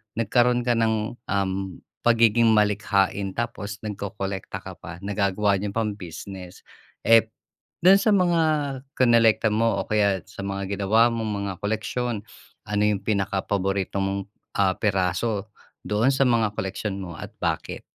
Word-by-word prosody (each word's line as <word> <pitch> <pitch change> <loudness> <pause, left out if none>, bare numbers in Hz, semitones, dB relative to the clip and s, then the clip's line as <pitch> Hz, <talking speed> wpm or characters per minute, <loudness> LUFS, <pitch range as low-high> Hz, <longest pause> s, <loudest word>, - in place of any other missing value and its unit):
nagkaroon 120 +2 +2
ka 120 - +1
ng, 110 -1 0
um, 100 -1 0 0.5
pagiging 115 -1 +4
malikhain 100 -2 +1
tapos 110 -3 -4
nagkokolekta 100 -2 -5
ka - - -7
pa 85 +3 -10
nagagawa 100 0 +1
niyo 100 0 -4
pang 110 -2 0
business. 90 +1 -9 0.4
Eh, 115 -1 +6 0.6
dun 195 +2 +7
sa 215 - +2
mga 175 -3 +3 0.5
kinolekta 115 -3 +4
mo 110 -1 +1
o - - -19
kaya 100 -4 +1
sa 100 +1 -8
mga 100 0 -3
ginawa 110 +4 +4
mong 110 -2 -2 0.2
mga 95 - -3
koleksiyon, 110 +1 -2 0.4
ano 105 0 0
yung 105 -2 +2
pinakapaborito 100 -1 -1
mong, 95 0 -2 0.3
ah, 95 -2 +3
piraso 100 +2 -1 0.4
doon 110 +6 +2
sa 135 0 +2
mga 115 -3 +2
koleksyon 95 +1 -3
mo 85 -3 -7
at - - -8
bakit? - - -2
105 Hz, 135 wpm, -24 LUFS, 100-115 Hz, 0.6 s, dun